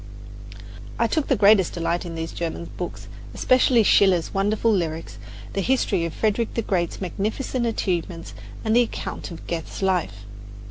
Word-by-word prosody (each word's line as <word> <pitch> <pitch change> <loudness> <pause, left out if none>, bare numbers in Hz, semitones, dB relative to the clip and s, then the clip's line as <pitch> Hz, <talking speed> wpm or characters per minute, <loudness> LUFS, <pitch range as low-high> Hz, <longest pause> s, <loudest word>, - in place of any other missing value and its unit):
I - - +2
took 310 -3 0
the 270 - +3
greatest 200 -4 +5
delight 170 +1 -1
in 165 - -6
these 165 0 -4
German 170 0 -5
books, - - -6 0.3
especially 255 -2 +4
Schiller's 190 -5 +4
wonderful 210 +3 +1
lyrics, 165 -5 -2 0.3
the 195 - 0
history 200 -7 +1
of 165 - -4
Frederick 220 +1 0
the 230 - 0
Great's 175 -4 -1
magnificent 220 +6 -2
achievements 175 -6 -2 0.3
and 220 +1 +2
the 240 - +7
account 235 - -4
of 170 - -10
Goethe's 170 +3 -4
life. 170 - 0
195 Hz, 150 wpm, -23 LUFS, 170-220 Hz, 0.3 s, the